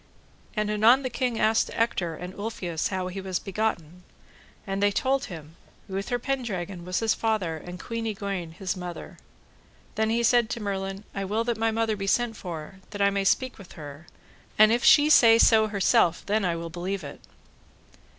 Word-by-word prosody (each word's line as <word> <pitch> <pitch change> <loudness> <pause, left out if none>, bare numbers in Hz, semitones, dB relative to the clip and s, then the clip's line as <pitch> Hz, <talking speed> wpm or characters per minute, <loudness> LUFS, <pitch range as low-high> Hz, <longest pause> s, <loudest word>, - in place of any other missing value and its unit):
And 210 -1 0
anon 225 +6 +5
the 255 - -3
king 240 -1 -1
asked 220 +1 +2
Ector 185 -8 0
and 180 +3 -8
Ulfius 190 -6 -3
how 185 -1 -3
he 185 +2 -5
was 190 -1 -2
begotten, 180 -5 -3 0.6
and 195 0 -3
they 205 - +4
told 270 +5 0
him 160 -4 -10 0.3
Uther 195 +5 -2
Pendragon 200 -9 -4
was 180 +3 -1
his 225 -1 +2
father 215 -8 -1
and 180 +3 -9
Queen 230 +1 -4
Igraine 195 -6 -4
his 185 +2 -3
mother. 180 -2 -8 0.7
Then 220 0 0
he 235 +1 +1
said 235 -1 +3
to 235 - -3
Merlin, 195 -1 -4
I 195 - -3
will 210 +4 -1
that 235 0 -1
my 225 0 +2
mother 225 -1 0
be 195 -1 -5
sent 240 +2 +1
for 175 0 -8
that 205 - -8
I 200 - +4
may 200 0 0
speak 255 +5 +1
with 195 - -13
her; 150 +1 -10 0.5
and 215 0 +7
if 240 +1 +1
she 295 0 +7
say 230 -6 +7
so 220 -1 +5
herself 190 -4 +2
then 215 +2 +1
will 170 -3 -2
I - - -6
believe 180 +2 -4
it. 140 0 -9
200 Hz, 185 wpm, -26 LUFS, 180-225 Hz, 0.7 s, and